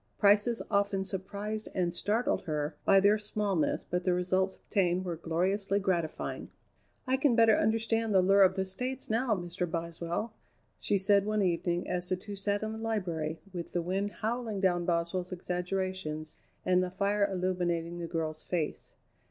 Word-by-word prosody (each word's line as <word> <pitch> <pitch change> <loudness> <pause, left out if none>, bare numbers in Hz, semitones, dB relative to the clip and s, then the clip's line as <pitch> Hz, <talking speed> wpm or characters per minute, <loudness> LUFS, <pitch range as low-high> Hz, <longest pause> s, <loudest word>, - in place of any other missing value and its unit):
Prices 210 +3 +4
often 200 -1 +2
surprised 200 +3 -4
and 175 -2 +1
startled 210 +4 0
her 150 -2 -2
by 195 - +6
their 205 +2 +4
smallness, 210 -4 0
but 180 0 -2
the 180 -1 +2
results 185 +1 +1
obtained 185 -3 0
were 175 -2 -2
gloriously 190 +5 0
gratifying. 175 -5 -2 0.6
"I 260 0 +2
can 265 -3 +3
better 225 -2 +6
understand 225 +1 +1
the 190 -2 +5
lure 195 +2 +5
of 190 -1 +6
the 190 -1 0
States 250 +7 -4
now, 230 0 +2
Mr. 175 -1 -3
Boswell," 170 +6 -3 0.5
she 205 - +1
said 200 +1 +4
one 215 -1 +1
evening 175 -1 0
as 180 -1 -1
the 185 - +2
two 200 +3 -8
sat 200 +1 -1
in 215 - -2
the 220 - -6
library 170 -8 -2
with 175 -2 -6
the 175 - +1
wind 195 +4 -1
howling 225 -1 -3
down 175 -2 +2
Boswell's 175 +2 -1
exaggerations 180 -3 -3 0.3
and 180 0 +4
the 185 - -1
fire 200 +2 +1
illuminating 175 -2 -1
the 170 - -4
girl's 160 -2 -3
face. 165 -4 -3
190 Hz, 165 wpm, -30 LUFS, 175-205 Hz, 0.6 s, by